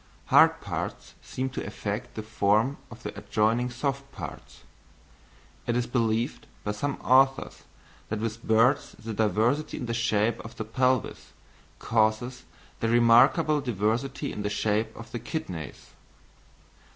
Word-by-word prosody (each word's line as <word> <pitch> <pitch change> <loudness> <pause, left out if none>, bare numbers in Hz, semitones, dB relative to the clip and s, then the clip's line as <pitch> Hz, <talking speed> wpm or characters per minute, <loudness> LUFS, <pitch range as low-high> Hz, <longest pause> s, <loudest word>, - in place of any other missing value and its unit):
Hard - - +6
parts - - -5
seem 130 +1 -4
to - - -4
affect 105 0 -5
the 110 - -4
form 110 +4 +1
of 120 +1 -13
adjoining 110 +4 0
soft 135 +2 -3
parts; - - -9 1.0
it 120 - +1
is 125 - 0
believed 115 +1 -1 0.2
by 105 - -1
some 140 +7 -2
authors 135 +1 +3 0.4
that 110 - -2
with 115 +1 -4
birds 115 +6 +3
the 110 0 -6
diversity 110 +7 +1
in - - -4
the 115 - -2
shape 115 -1 +1
of 115 - -10
the 110 - -5
pelvis 130 +2 0 0.4
causes 115 +3 0 0.3
the 115 - 0
remarkable 120 +6 +5
diversity 125 +4 -1
in 105 - -5
the 105 - -1
shape 110 +1 0
of 115 0 -10
the 120 - -4
kidneys. 90 - -6
115 Hz, 135 wpm, -27 LUFS, 110-130 Hz, 1.0 s, Hard